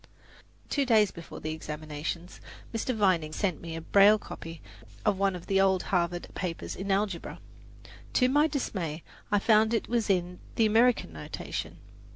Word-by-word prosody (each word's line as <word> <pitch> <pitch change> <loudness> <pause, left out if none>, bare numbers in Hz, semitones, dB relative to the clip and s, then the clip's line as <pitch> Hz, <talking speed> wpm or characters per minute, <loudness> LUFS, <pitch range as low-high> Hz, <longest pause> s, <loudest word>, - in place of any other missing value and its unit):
Two 285 - +1
days 220 -6 +4
before 170 - -10
the 155 - -3
examinations, 155 +2 -5 0.3
Mr. 230 +2 -1
Vining 185 -7 +2
sent 180 0 -1
me 165 -1 -6
a 165 - -5
braille 200 +5 +6
copy 165 -5 -9 0.5
of 195 - +2
one 195 -1 +2
of 175 - -8
the 195 -1 +2
old 190 -1 +3
Harvard 175 -1 0
papers 180 -3 -4
in 195 +2 -5
algebra. 195 -2 -1 0.7
To 250 - +4
my 295 +4 +4
dismay 180 - -3 0.3
I 205 - +4
found 215 +1 +4
that 230 - +2
it - - -15
was 235 -2 0
in 180 -2 0 0.2
the 225 - +4
American 225 - +3
notation. 75 - -6
195 Hz, 165 wpm, -29 LUFS, 165-215 Hz, 0.7 s, braille